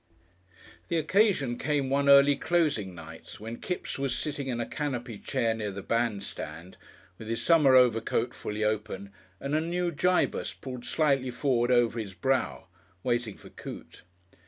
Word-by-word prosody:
The 170 Hz, -, 0 dB
occasion 160 Hz, -, +2 dB
came 145 Hz, -3 st, 0 dB
one 140 Hz, 0 st, +2 dB
early 140 Hz, +1 st, +7 dB
closing 150 Hz, -, 0 dB
night 80 Hz, -1 st, -11 dB
when 115 Hz, +2 st, -7 dB
Kipps 180 Hz, -5 st, -4 dB
was 135 Hz, -1 st, -1 dB
sitting 145 Hz, -3 st, -3 dB
in 120 Hz, -2 st, -2 dB
a 120 Hz, -, -1 dB
canopy 125 Hz, -7 st, -4 dB
chair 120 Hz, -5 st, 0 dB
near 110 Hz, -2 st, -3 dB
the 100 Hz, 0 st, -7 dB
bandstand, 100 Hz, -7 st, -3 dB, 0.4 s
with 110 Hz, -, -8 dB
his 115 Hz, +1 st, -2 dB
summer 150 Hz, -6 st, +5 dB
overcoat 120 Hz, -1 st, +3 dB
fully 105 Hz, +1 st, -4 dB
open 105 Hz, -2 st, -2 dB, 0.3 s
and 140 Hz, +1 st, -4 dB
a 155 Hz, -, +3 dB
new 175 Hz, +1 st, -1 dB
Gibus 180 Hz, +4 st, 0 dB
pulled 125 Hz, -2 st, -7 dB
slightly 140 Hz, -5 st, +1 dB
forward 125 Hz, -1 st, +1 dB
over 120 Hz, -2 st, +3 dB
his 100 Hz, -4 st, -6 dB
brow, 130 Hz, +2 st, 0 dB, 0.4 s
waiting 120 Hz, -4 st, -1 dB
for -, -, -14 dB
Coote. -, -, -10 dB
125 Hz, 155 wpm, -28 LUFS, 110-145 Hz, 0.4 s, early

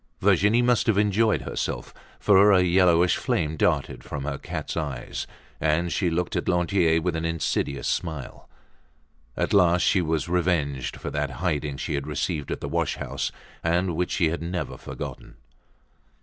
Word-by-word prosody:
Virginie 110 Hz, +5 st, +4 dB
must 125 Hz, -1 st, +2 dB
have 110 Hz, -3 st, +3 dB
enjoyed 105 Hz, +2 st, +2 dB
herself, -, -, -4 dB, 0.3 s
for 100 Hz, 0 st, +6 dB
a 95 Hz, -2 st, +5 dB
yellowish 90 Hz, -1 st, +4 dB
flame 80 Hz, 0 st, -1 dB
darted -, -, 0 dB
from 70 Hz, -1 st, -5 dB
her 70 Hz, -1 st, -3 dB
cat's -, -, -5 dB
eyes, 70 Hz, -7 st, -4 dB, 0.3 s
and 80 Hz, +2 st, +1 dB
she 90 Hz, -, +1 dB
looked 85 Hz, +1 st, -1 dB
at -, -, -1 dB
Lantier 90 Hz, -2 st, +2 dB
with 85 Hz, 0 st, -1 dB
an 80 Hz, -, -2 dB
insidious 80 Hz, -4 st, -1 dB
smile. 80 Hz, -6 st, -4 dB, 0.9 s
At -, -, 0 dB
last 90 Hz, -3 st, +4 dB
she 95 Hz, -, +3 dB
was 80 Hz, -1 st, -1 dB
revenged 85 Hz, -7 st, 0 dB
for -, -, -6 dB
that 75 Hz, 0 st, -1 dB
hiding 75 Hz, -4 st, -1 dB
she -, -, -3 dB
had 70 Hz, 0 st, -2 dB
received 75 Hz, +1 st, -2 dB
at -, -, -4 dB
the -, -, -3 dB
wash 85 Hz, +1 st, -1 dB
house, -, -, -3 dB, 0.3 s
and 85 Hz, +1 st, +1 dB
which 90 Hz, +2 st, -1 dB
she 85 Hz, -, +2 dB
had 85 Hz, +1 st, -3 dB
never 90 Hz, +2 st, -3 dB
forgotten. -, -, -8 dB
85 Hz, 165 wpm, -25 LUFS, 75-90 Hz, 0.9 s, for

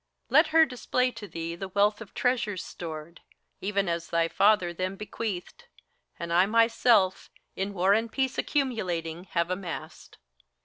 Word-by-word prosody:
Let -, -, +6 dB
her 320 Hz, 0 st, +6 dB
display 250 Hz, -1 st, 0 dB
to 210 Hz, -, -9 dB
thee 165 Hz, -2 st, -5 dB
the 195 Hz, +3 st, -5 dB
wealth 205 Hz, +3 st, +2 dB
of 225 Hz, -, -11 dB
treasures 235 Hz, -7 st, 0 dB
stored, 160 Hz, 0 st, -8 dB, 0.4 s
Even 200 Hz, 0 st, -1 dB
as 170 Hz, 0 st, -2 dB
thy 165 Hz, 0 st, +1 dB
father 200 Hz, -3 st, +3 dB
them 185 Hz, +2 st, -3 dB
bequeathed, 210 Hz, -, -5 dB, 0.5 s
and 170 Hz, -1 st, -4 dB
I 180 Hz, +3 st, +5 dB
myself, 230 Hz, -3 st, +3 dB, 0.3 s
In 195 Hz, +2 st, -2 dB
war 190 Hz, +2 st, +4 dB
and 225 Hz, +2 st, 0 dB
peace 265 Hz, -1 st, -1 dB
accumulating, 180 Hz, -, -2 dB
have 170 Hz, -1 st, -1 dB
amassed. 185 Hz, -2 st, -6 dB
195 Hz, 145 wpm, -27 LUFS, 175-230 Hz, 0.5 s, Let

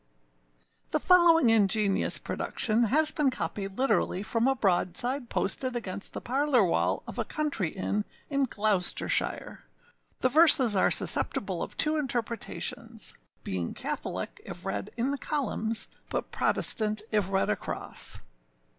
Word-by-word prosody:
[THE -, -, +1 dB
following 335 Hz, -8 st, +5 dB
ingenious 205 Hz, -2 st, +3 dB
production 225 Hz, +2 st, +1 dB
has 305 Hz, +7 st, +5 dB
been 300 Hz, -5 st, +1 dB
copied 195 Hz, -6 st, -3 dB
literally 210 Hz, -6 st, +2 dB
from 230 Hz, +3 st, 0 dB
a 270 Hz, -, +2 dB
broadside 235 Hz, +5 st, 0 dB
posted 255 Hz, +6 st, -2 dB
against 200 Hz, -4 st, -4 dB
the -, -, -6 dB
âparlourâ 260 Hz, -4 st, +2 dB
wall -, -, 0 dB
of -, -, -7 dB
a -, -, +1 dB
country 290 Hz, -, -2 dB
inn 200 Hz, +4 st, -2 dB, 0.2 s
in 275 Hz, -1 st, 0 dB
Gloucestershire. 205 Hz, -6 st, -1 dB, 0.6 s
The 255 Hz, -, +3 dB
verses 275 Hz, -6 st, +5 dB
are 190 Hz, -, +3 dB
susceptible -, -, +1 dB
of -, -, -6 dB
two 310 Hz, 0 st, +3 dB
interpretations, 240 Hz, -5 st, -2 dB, 0.3 s
being 90 Hz, -2 st, -4 dB
Catholic -, -, -5 dB
if -, -, -9 dB
read 100 Hz, -1 st, -4 dB
in 245 Hz, +4 st, 0 dB
the 285 Hz, -, -3 dB
columns, 230 Hz, -6 st, 0 dB, 0.2 s
but -, -, -4 dB
Protestant 215 Hz, -1 st, 0 dB
if 205 Hz, -4 st, +1 dB
read 195 Hz, -, +1 dB
across. 105 Hz, -, -1 dB
230 Hz, 130 wpm, -28 LUFS, 200-275 Hz, 0.6 s, following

